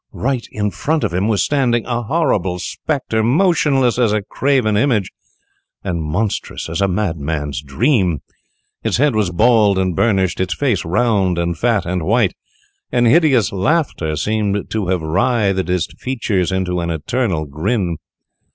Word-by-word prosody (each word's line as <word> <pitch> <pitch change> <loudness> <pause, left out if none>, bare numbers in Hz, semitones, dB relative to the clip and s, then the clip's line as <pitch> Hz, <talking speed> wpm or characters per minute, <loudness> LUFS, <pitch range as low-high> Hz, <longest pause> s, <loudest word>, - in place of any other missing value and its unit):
Right 125 -1 -2
in 105 -1 -2
front 155 +7 -1
of - - -1
him 95 +4 0
was 105 -4 +2
standing 125 -5 +1
a 120 -1 -2
horrible 105 - 0
spectre, 120 - -2
motionless 135 - +2
as 115 -4 +3
a 105 -1 0
carven 130 -2 +1
image, 110 -4 +1 0.7
and 85 -2 -2
monstrous 90 +8 -2
as 80 +4 -2
a 100 - +3
madman's 80 - -2
dream! 90 - +1 0.6
Its - - 0
head 145 +1 +3
was 105 -4 +1
bald 105 +1 +3
and 95 -2 0
burnished; 95 -4 +1
its 95 -1 -1
face 125 - 0
round, 95 -1 +1
and 85 0 -1
fat, 115 +4 +1
and 90 0 -2
white; 105 +2 +2 0.6
and 120 -1 +2
hideous 135 - +4
laughter 100 - 0
seemed 105 +2 -1
to 110 -4 -1
have 90 -3 0
writhed 95 +2 +1
its 90 -2 +1
features 105 -8 -1
into 90 -1 -1
an 85 - -3
eternal 85 - -1
grin. 85 - -2
105 Hz, 150 wpm, -18 LUFS, 90-120 Hz, 0.7 s, hideous